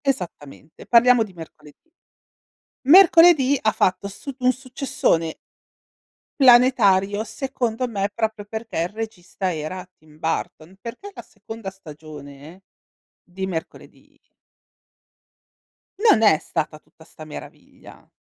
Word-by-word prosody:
Esattamente, 165 - -5
parliamo 240 0 +5
di 210 -4 -7
Mercoledì. 160 - -15 1.0
Mercoledì 330 -6 +7
ha 215 - +1
fatto 195 +1 0
su 260 +7 -9
un 250 0 +3
successone 255 - -2 1.0
planetario 220 -6 +4
secondo 240 +1 -3
me 200 -4 -2
proprio 220 -2 -3
perché 220 -2 -6
il 170 +2 0
regista 200 -3 -5
era 160 +4 -6
Tim 155 0 -21
Burton, 160 +2 -4
perché 315 - -9
la - - -10
seconda 225 -3 -10
stagione 155 -2 -12 0.6
di 190 +1 -6
Mercoledì 165 -4 -9 1.8
non 415 - +4
è 180 -8 +5
stata 155 0 -4
tutta 160 - -23
sta 160 -1 -13
meraviglia. 155 - -13
205 Hz, 105 wpm, -22 LUFS, 165-245 Hz, 1.8 s, Mercoledì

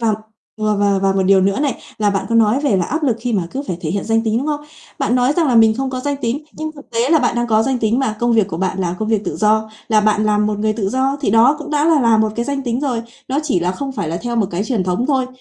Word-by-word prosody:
Và 225 -2 +2 0.4
và 215 -1 +1
và 200 -1 +2
và 195 0 +3
một 195 0 +1
điều 190 0 +4
nữa 195 +5 +1
này, 285 -2 -1 0.2
là 210 -1 +2
bạn 195 -1 -2
có 230 - -1
nói 225 +3 +3
về 280 -9 +1
là 180 - +1
áp 315 +4 -2
lực 255 -6 +1
khi 245 +1 -2
mà 190 -5 0
cứ 275 - -4
phải 180 - -3
thể 155 - -3
hiện 200 +2 -2
danh 225 0 +1
tính, 220 0 +1
đúng 275 - -3
không? 295 -1 -1 0.4
Bạn 230 - 0
nói 250 +2 +2
rằng 325 +1 +1
là 250 - +2
mình 220 -1 +5
không 265 +2 -2
có 255 -1 -4
danh 285 +2 -2
tính, 265 +6 -2
nhưng 310 0 -5
thực 285 -2 -15
tế 235 +2 0
là 325 - +5
bạn 250 -4 0
đang 240 0 0
có 220 -1 +3
danh 260 +2 0
tính 225 +1 +1
mà, 220 -5 -1
công 240 0 +2
việc 220 -4 +2
của 165 - -4
bạn 190 +2 -2
là 175 -1 -1
công 215 - -2
việc 215 -2 0
tự - - -3
do, 220 0 +1 0.2
là 215 -1 +4
bạn 215 0 +2
làm 210 0 +2
một 210 -1 -2
người 215 +1 +1
tự 210 -3 -2
do 265 +4 0
thì 270 - 0
đó 235 +7 +5
cũng 300 - -8
đã 295 0 +1
là 320 -3 +4
là 230 -3 +4
một 220 -1 +1
cái 235 - -1
danh 280 0 -2
tính 245 -1 -2
rồi. 250 -5 -1 0.3
Nó 270 +2 0
chỉ 275 - 0
là 180 +1 0
không 270 +8 -5
phải 170 - -3
là 165 - -2
theo 240 0 -3
một 215 - +2
cái 175 +4 -2
truyền 220 -7 -1
thống 185 +7 -1
thôi, 265 -3 +1
225 Hz, 325 wpm, -18 LUFS, 210-265 Hz, 0.4 s, mình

